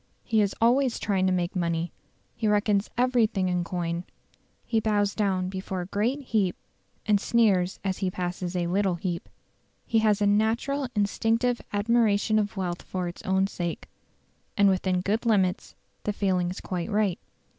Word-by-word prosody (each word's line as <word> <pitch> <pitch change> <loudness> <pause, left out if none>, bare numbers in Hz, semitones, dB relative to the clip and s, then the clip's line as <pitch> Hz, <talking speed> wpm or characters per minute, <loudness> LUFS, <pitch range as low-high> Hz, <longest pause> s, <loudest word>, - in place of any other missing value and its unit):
He 220 -2 +2
is 200 -1 0
always 245 +2 +3
trying 190 -2 +1
to - - +2
make 180 0 -1
money; 170 -1 -1 0.4
he 220 - -1
reckons 210 -1 +2
everything 230 -6 +2
in 180 -1 0
coin; 170 0 -3 0.6
he 225 - +1
bows 205 -2 +1
down 190 -3 0
before 190 0 -4
a - - -5
great 220 +9 -1
heap 210 -7 0 0.5
and 205 -1 +3
sneers 195 -6 +2
as 190 -2 -2
he 190 -2 0
passes 180 0 -4
a 175 -1 0
little 190 +1 +1
heap. 170 0 -4 0.6
He 225 - +2
has 215 -2 +3
a 205 - +2
"natural 225 +7 +1
instinctive 225 +4 +1
admiration 215 0 +2
of 205 0 -2
wealth 180 -2 -2
for 185 -1 -4
its 175 - -7
own 190 0 +2
sake". 175 -4 -4 0.7
And 200 -1 +6
within 185 -1 +1
good 205 +5 0
limits 195 -5 +1 0.3
the 210 - -1
feeling 185 -3 0
is 185 - -6
quite 180 +1 -4
right. 205 -4 +1
200 Hz, 165 wpm, -26 LUFS, 180-220 Hz, 0.7 s, And